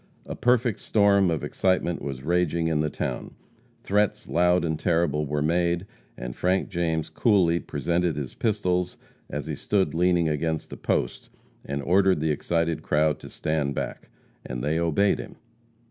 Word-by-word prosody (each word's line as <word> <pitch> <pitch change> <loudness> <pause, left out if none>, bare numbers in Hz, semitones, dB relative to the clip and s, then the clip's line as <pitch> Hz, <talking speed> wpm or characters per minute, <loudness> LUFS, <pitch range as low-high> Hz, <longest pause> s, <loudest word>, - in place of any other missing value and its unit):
A - - -6
perfect 120 -2 +2
storm 100 -3 +3
of 80 -3 -1
excitement 90 -2 0
was 65 -2 -5
raging 85 0 +1
in 80 -2 +1
the 75 0 +1
town. - - -4 0.5
Threats 105 0 +1
loud 90 +1 +3
and 80 -2 -1
terrible 80 -4 +1
were 75 +1 -1
made, 85 +2 +1 0.3
and 60 0 -6
Frank 95 +4 +1
James 80 -4 -1
coolly 85 0 +3
presented 85 +2 -1
his 70 -3 -5
pistols 90 -5 0 0.3
as 75 - -4
he 80 - -3
stood 95 +2 0
leaning 85 0 +2
against 80 +1 -2
a - - -7
post - - -2 0.3
and 70 0 -4
ordered 95 0 +3
the 80 +1 +1
excited 85 +1 0
crowd 75 0 +1
to - - -10
stand 75 -3 -1
back, - - -5 0.3
and 60 -1 -5
they 80 +3 +1
obeyed 85 +4 +2
him. - - -8
85 Hz, 160 wpm, -26 LUFS, 75-90 Hz, 0.5 s, storm